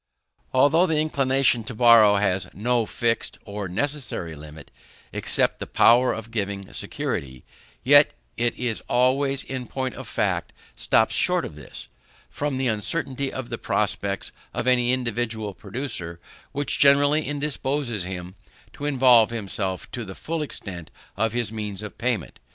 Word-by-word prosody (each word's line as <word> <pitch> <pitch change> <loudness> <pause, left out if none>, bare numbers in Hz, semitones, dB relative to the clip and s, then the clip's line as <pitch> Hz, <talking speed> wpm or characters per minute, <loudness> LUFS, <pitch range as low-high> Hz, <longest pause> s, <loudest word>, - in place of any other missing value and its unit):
Although 145 +7 +4
the 160 -2 +1
inclination 135 -5 +2
to 120 - -6
borrow 115 -3 +7
has 95 -2 +1
no 120 +1 0
fixed 115 +1 -1
or 100 -1 -5
necessary 110 - -3
limit 75 +1 -12 0.4
except - - +1
the - - -5
power 125 +2 +5
of 115 0 -6
giving 100 -3 -4
security, 65 -2 -4 0.4
yet - - +6 0.2
it 120 -1 -1
always, 135 +2 +2
in 130 -2 -6
point 130 0 -3
of - - -9
fact, - - -1 0.2
stops - - +2
short - - +1
of - - -8
this; 75 -2 -10 0.4
from 145 -2 -2
the 130 - -1
uncertainty 135 +4 -2
of 130 -2 -6
the - - -3
prospects - - -1 0.2
of - - -2
any 125 -1 +3
individual 115 -4 -2
producer, 100 -6 -4 0.3
which 145 0 -2
generally 145 +2 +5
indisposes 140 -6 -2
him 90 0 -6 0.4
to 145 - -7
involve 125 -5 +5
himself 100 -4 -3
to 120 - -5
the 95 -3 -9
full 165 0 -4
extent 90 - -5 0.3
of 110 +1 0
his 120 -4 -1
means 105 -2 -5
of 105 - -9
payment. 120 -7 -2
120 Hz, 145 wpm, -24 LUFS, 100-135 Hz, 0.4 s, borrow